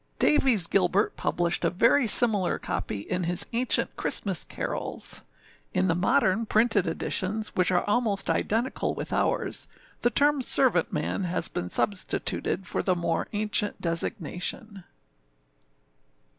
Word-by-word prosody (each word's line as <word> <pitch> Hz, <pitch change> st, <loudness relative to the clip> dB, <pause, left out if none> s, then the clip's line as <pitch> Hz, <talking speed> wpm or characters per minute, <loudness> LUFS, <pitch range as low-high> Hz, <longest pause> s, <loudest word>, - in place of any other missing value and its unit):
Davies 255 Hz, -, +3 dB
Gilbert 190 Hz, +3 st, +1 dB
published 175 Hz, 0 st, 0 dB
a 170 Hz, -, +3 dB
very 235 Hz, +8 st, +3 dB
similar 210 Hz, -5 st, +3 dB
copy 100 Hz, -, -4 dB
in 180 Hz, -, -3 dB
his 175 Hz, +1 st, +1 dB
Ancient 245 Hz, +2 st, +1 dB
Christmas 190 Hz, -5 st, -1 dB
Carols. -, -, -5 dB, 0.5 s
In -, -, +2 dB
the -, -, +3 dB
modern 220 Hz, +3 st, +1 dB
printed 215 Hz, -4 st, +2 dB
editions, 200 Hz, +6 st, -2 dB
which 180 Hz, -1 st, +1 dB
are 180 Hz, -1 st, +1 dB
almost 210 Hz, -2 st, 0 dB
identical 235 Hz, +5 st, -1 dB
with -, -, -4 dB
ours, -, -, -1 dB, 0.3 s
the 240 Hz, -, +3 dB
term 285 Hz, +2 st, +2 dB
âservantmanâ 200 Hz, -5 st, +1 dB
has 180 Hz, -, +1 dB
been 90 Hz, -, -4 dB
substituted 195 Hz, -, 0 dB
for -, -, -2 dB
the 185 Hz, -, +1 dB
more 170 Hz, -1 st, -1 dB
ancient 210 Hz, 0 st, -1 dB
designation. 180 Hz, +3 st, -3 dB
200 Hz, 125 wpm, -26 LUFS, 180-225 Hz, 0.5 s, Davies